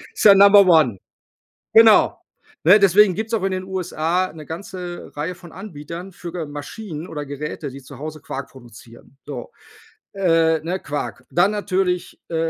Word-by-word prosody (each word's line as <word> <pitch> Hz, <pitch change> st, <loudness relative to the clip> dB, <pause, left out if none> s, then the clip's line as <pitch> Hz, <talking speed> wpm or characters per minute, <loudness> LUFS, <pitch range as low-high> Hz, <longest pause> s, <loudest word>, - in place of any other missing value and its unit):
Ist -, -, -3 dB
ja 205 Hz, -2 st, +9 dB
Number 200 Hz, 0 st, +7 dB
one. 155 Hz, -, +4 dB, 0.8 s
Genau, 225 Hz, -1 st, +6 dB, 0.5 s
ne, -, -, +8 dB
deswegen 200 Hz, -1 st, +5 dB
gibt's 220 Hz, +2 st, -4 dB
auch 215 Hz, -, 0 dB
in 195 Hz, -, 0 dB
den 185 Hz, 0 st, -3 dB
USA 180 Hz, -2 st, -2 dB
'ne 155 Hz, -2 st, -11 dB
ganze 175 Hz, +1 st, -7 dB
Reihe 155 Hz, +5 st, -3 dB
von 175 Hz, -2 st, -15 dB
Anbietern 175 Hz, -1 st, -9 dB
für 175 Hz, 0 st, -9 dB
ga 170 Hz, -3 st, -4 dB
Maschinen 155 Hz, +4 st, -8 dB
oder 150 Hz, -2 st, -6 dB
Geräte, 145 Hz, +1 st, -6 dB
die 135 Hz, +1 st, -11 dB
zu 130 Hz, +1 st, -13 dB
Hause 155 Hz, 0 st, -7 dB
Quark 135 Hz, 0 st, -7 dB
produzieren. 120 Hz, 0 st, -16 dB
So, 135 Hz, -5 st, -7 dB, 0.6 s
äh, 165 Hz, -4 st, +2 dB
ne, 175 Hz, +4 st, -3 dB
Quark. 140 Hz, -3 st, -5 dB
Dann 175 Hz, +4 st, +3 dB
natürlich, 190 Hz, -3 st, -2 dB
äh, 165 Hz, -, -4 dB
170 Hz, 165 wpm, -21 LUFS, 150-190 Hz, 0.8 s, ja